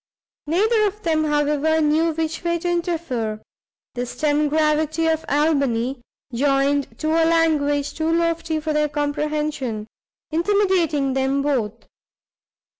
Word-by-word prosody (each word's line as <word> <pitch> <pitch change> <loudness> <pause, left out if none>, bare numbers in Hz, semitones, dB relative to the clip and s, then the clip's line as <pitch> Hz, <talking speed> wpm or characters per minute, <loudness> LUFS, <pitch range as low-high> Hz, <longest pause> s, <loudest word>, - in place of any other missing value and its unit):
Neither 425 +6 +2
of 420 +1 -7
them, 315 -2 +1
however, 300 +1 +1
knew 315 +2 +2
which 325 +1 -3
way 340 0 0
to 340 - -4
interfere, 325 -11 -2 0.5
the 245 0 -3
stem 300 +2 0
gravity 310 +1 +1
of 320 0 +1
Albany, 275 -4 +1 0.3
joined 275 +2 +1
to 310 - 0
a 330 +1 +3
language 305 -4 +2
too 320 0 -1
lofty 335 -1 0
for 310 0 -2
their 300 0 +1
comprehension, 290 -5 -2 0.5
intimidating 340 -6 +1
them 270 +1 0
both. 250 -8 -2
305 Hz, 120 wpm, -22 LUFS, 285-330 Hz, 0.5 s, a